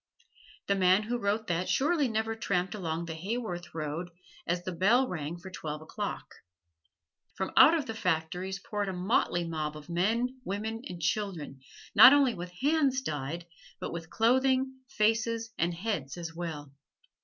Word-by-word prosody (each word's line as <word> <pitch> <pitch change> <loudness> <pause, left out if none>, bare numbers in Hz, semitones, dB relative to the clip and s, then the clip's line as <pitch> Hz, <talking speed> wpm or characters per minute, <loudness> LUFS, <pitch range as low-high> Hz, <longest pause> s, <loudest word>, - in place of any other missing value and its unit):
The 200 - +2
man 190 +1 +4
who 240 +3 -2
wrote 210 +1 0
that 175 0 -1
surely 295 0 +2
never 225 0 -1
tramped 190 -4 -1
along 170 -4 -3
the 165 - -5
Haworth 180 -1 -4
road 155 +3 -3 0.4
as 175 +1 0
the 185 - -3
bell 215 +9 +3
rang 160 -3 -4
for 185 +2 -10
twelve 155 -4 -5
o'clock. 155 - -5 1.1
From - - -3
out 315 -2 +7
the 225 - -4
factories 180 -1 -1
poured 205 0 -3
a - - -3
motley 180 -1 +1
mob 155 -2 -3
of 150 +2 -13
men, 230 +9 0
women 220 +3 -3
and 175 -1 -7
children, 160 -5 -2 0.3
not 260 - +10
only 275 -4 +4
with 175 -2 -6
hands 275 - +1
dyed, 155 - -4 0.3
but - - -5
with 165 -1 -6
clothing, 260 +3 +2 0.2
faces 225 -1 +1
and 170 +2 +2
heads 175 -7 -3
as 170 -1 -6
well. 155 -5 -6
190 Hz, 155 wpm, -30 LUFS, 170-225 Hz, 1.1 s, not